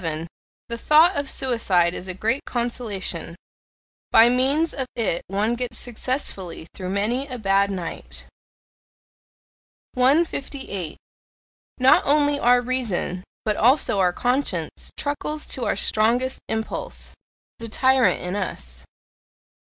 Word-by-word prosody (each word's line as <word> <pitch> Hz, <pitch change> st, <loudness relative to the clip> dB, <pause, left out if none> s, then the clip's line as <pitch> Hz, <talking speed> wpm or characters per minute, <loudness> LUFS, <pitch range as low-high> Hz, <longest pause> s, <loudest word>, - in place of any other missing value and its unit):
The 235 Hz, 0 st, -4 dB
thought 315 Hz, +8 st, +5 dB
of 285 Hz, -1 st, -2 dB
suicide 195 Hz, -10 st, +1 dB
is 185 Hz, -, -7 dB
a 185 Hz, -, -4 dB
great 225 Hz, +8 st, 0 dB
consolation: 210 Hz, -8 st, -3 dB, 0.8 s
by 230 Hz, +1 st, +7 dB
means 275 Hz, +6 st, +2 dB
of 265 Hz, -2 st, -3 dB
it 210 Hz, -7 st, 0 dB
one 205 Hz, +4 st, 0 dB
gets 240 Hz, -1 st, -3 dB
successfully 225 Hz, -, -3 dB
through 185 Hz, -2 st, -6 dB
many 225 Hz, +8 st, 0 dB
a 255 Hz, -3 st, -5 dB
bad 200 Hz, -2 st, +2 dB
night. 185 Hz, -4 st, -6 dB, 1.7 s
158. 265 Hz, -, 0 dB, 0.8 s
Not 260 Hz, +1 st, +5 dB
only 290 Hz, 0 st, +2 dB
our 245 Hz, 0 st, +4 dB
reason, 235 Hz, -8 st, -2 dB, 0.2 s
but 215 Hz, -1 st, +1 dB
also 245 Hz, -4 st, +4 dB
our 180 Hz, -2 st, +3 dB
conscience, 245 Hz, -, -2 dB
truckles 300 Hz, +1 st, -3 dB
to 250 Hz, -, -1 dB
our -, -, +1 dB
strongest 240 Hz, +4 st, +1 dB
impulse 220 Hz, 0 st, -4 dB, 0.5 s
the 230 Hz, 0 st, -7 dB
tyrant 260 Hz, 0 st, +3 dB
in 180 Hz, +2 st, -3 dB
us. 65 Hz, -, -5 dB
235 Hz, 115 wpm, -23 LUFS, 195-265 Hz, 1.7 s, by